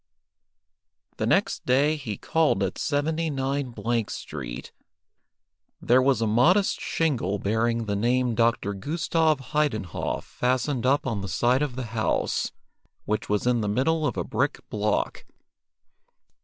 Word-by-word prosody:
The - - -1
next - - +1
day 140 +5 +3
he 115 -9 -5
called 155 -11 +1
at 95 - -3
79 145 -4 -1 0.3
Street. - - -7 1.1
There 125 +2 +4
was 130 -3 +2
a - - +2
modest 145 - +3
shingle 120 - 0
bearing 115 +3 0
the 100 -1 -1
name 120 +3 +1
"Dr. 115 -3 +1
Gustav 155 - 0
Heidenhoff" 135 - -1
fastened 130 +1 -1
up 140 +2 +2
on 110 -6 -2
the 95 - -5
side 125 - +2
of 145 -4 -1
the 130 - -3
house, 110 -2 0 0.5
which 105 0 -2
was 105 +1 0
in 125 -2 +2
the 105 - -1
middle 150 +8 +1
of 120 - -3
a - - 0
brick - - -2
block. 105 0 -1
125 Hz, 130 wpm, -26 LUFS, 105-145 Hz, 1.1 s, There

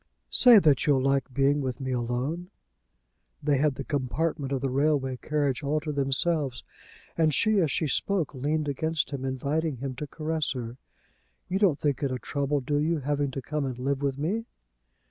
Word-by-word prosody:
"Say 245 -3 +8
that 155 -7 +4
you'll 140 -3 +4
like 135 0 +1
being 140 +2 +2
with 130 0 -3
me 130 -1 -3
alone." 125 +9 -2 0.9
They 145 -2 +2
had 145 -1 +2
the 135 - -5
compartment 140 +2 -2
of 135 -2 -1
the 135 - 0
railway 135 -2 +1
carriage 145 -2 -1
all 150 +1 0
to 155 0 -3
themselves, 140 -1 0 0.5
and 160 -2 +3
she, 215 +7 +3
as 165 -5 +2
she 160 - 0
spoke, 175 +1 0
leaned 150 +3 -1
against 160 +3 -1
him, 135 -2 -4
inviting 140 +3 -1
him 135 +2 -4
to 150 - -5
caress 155 -1 -2
her. 120 -1 -6 0.7
"You 190 - -1
don't 185 -9 +3
think 145 -1 0
it 140 - 0
a 130 - -1
trouble, 140 +2 -1
do 145 +3 0
you, 155 +1 0
having 145 +1 0
to 135 0 -6
come 150 +3 -2
and 130 -3 -3
live 135 +2 -1
with 140 -2 -1
me?" 195 +11 -2
145 Hz, 185 wpm, -27 LUFS, 135-155 Hz, 0.9 s, Say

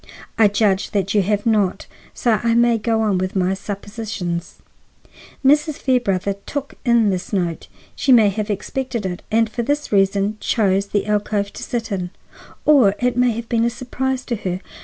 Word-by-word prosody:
"I 220 - +5
judge 205 -1 +1
that 195 -1 0
you 210 - +4
have 205 +2 -1
not, 210 -5 +1 0.3
so 240 - 0
I 230 -1 +1
may 235 -1 +3
go 225 0 0
on 200 -4 +1
with 185 +1 -3
my 185 0 +1
suppositions. 200 -3 -5 0.9
Mrs. 295 +2 +4
Fairbrother 200 -9 0
took 285 -1 -4
in 235 -4 +3
this 180 -1 -4
note. 175 -5 -2 0.3
She 270 - +1
may 225 -5 +7
have 210 +1 -3
expected 235 +2 -3
it 180 -1 -4
and 225 +1 +3
for 230 +2 -4
this 290 +5 -2
reason 200 +1 +2
chose 200 -3 +1
the 205 0 -1
alcove 210 -1 -1
to - - -9
sit 230 -2 -4
in, 180 -3 -2 0.6
or 255 -10 +5
it 250 -1 0
may 250 0 +3
have 230 +1 -6
been 230 -1 +1
a 235 - +3
surprise 255 +2 -3
to 235 - -2
her. 185 -2 -3
215 Hz, 180 wpm, -20 LUFS, 195-235 Hz, 0.9 s, may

